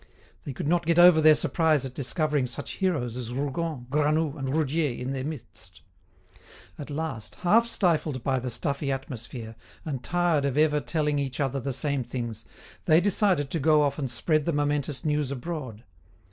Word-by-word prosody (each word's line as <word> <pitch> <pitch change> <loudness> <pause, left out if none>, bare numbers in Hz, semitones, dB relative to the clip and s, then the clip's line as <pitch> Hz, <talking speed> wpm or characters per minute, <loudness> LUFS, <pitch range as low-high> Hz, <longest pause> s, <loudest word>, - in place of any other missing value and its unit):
They 140 - -5
could 130 - -4
not 170 0 +1
get 170 0 +2
over 175 -2 +8
their 155 0 +7
surprise 155 -5 +1
at 130 - -6
discovering 145 0 0
such 120 - -6
heroes 145 -12 -1
as 120 -2 -5
Rougon, 140 +1 -3
Granoux, 150 +1 +1
and 135 -3 -4
Roudier 150 -1 0
in 130 +2 -3
their 130 -1 -3
midst. 150 -4 -9 1.0
At 145 - -7
last, 145 -7 -4
half 230 +6 +5
stifled 160 - 0
by 130 -1 +1
the 125 +1 -4
stuffy 140 +4 -2
atmosphere, 120 -3 -6 0.3
and 135 -6 -4
tired 175 -3 +1
of 140 0 -1
ever 150 -1 +3
telling 150 +2 -1
each 135 -3 -3
other 135 -1 0
the 135 +2 -3
same 135 +1 0
things, 120 -3 -5 0.4
they 155 +1 +5
decided 185 -6 +2
to 165 - 0
go 155 +1 +4
off 140 +1 -1
and 135 -3 -2
spread 150 +5 0
the 170 - 0
momentous 145 -1 -1
news 150 -2 0
abroad. 135 -5 -6
145 Hz, 175 wpm, -26 LUFS, 130-160 Hz, 1.0 s, over